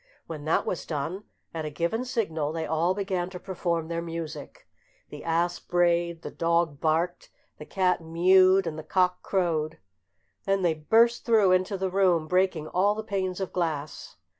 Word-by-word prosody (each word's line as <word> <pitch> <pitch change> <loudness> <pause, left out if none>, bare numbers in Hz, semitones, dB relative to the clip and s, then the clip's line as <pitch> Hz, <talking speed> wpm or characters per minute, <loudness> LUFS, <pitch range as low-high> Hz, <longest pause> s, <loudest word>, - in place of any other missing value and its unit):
When 155 -3 -7
that 155 - +1
was 180 - -4
done, 165 +6 -4 0.3
at 160 -1 -4
a 155 - -3
given 170 - -2
signal 165 - -2
they 160 0 -3
all 165 +4 +1
began 190 -3 -2
to 185 -1 -8
perform 170 -4 -2
their 170 0 -3
music. 165 -3 -7 0.4
The - - -9
ass 170 +1 0
brayed, 170 -1 +1
the - - -6
dog 170 -3 0
barked, 165 +3 0 0.3
the 150 - -9
cat 185 -2 +1
mewed, 185 +3 +4
and 160 -1 -4
the - - -7
cock 180 +2 +1
crowed; 165 -5 -1 0.7
then 195 -1 +1
they 170 -2 +3
burst 225 +10 +3
through 220 -5 +4
into 185 +2 +1
the 190 0 -2
room, 180 -4 +2
breaking 180 -3 +1
all 200 +3 +2
the 220 - -4
panes 190 -3 -2
of 190 - -4
glass. 155 -4 -3
175 Hz, 170 wpm, -27 LUFS, 160-190 Hz, 0.7 s, mewed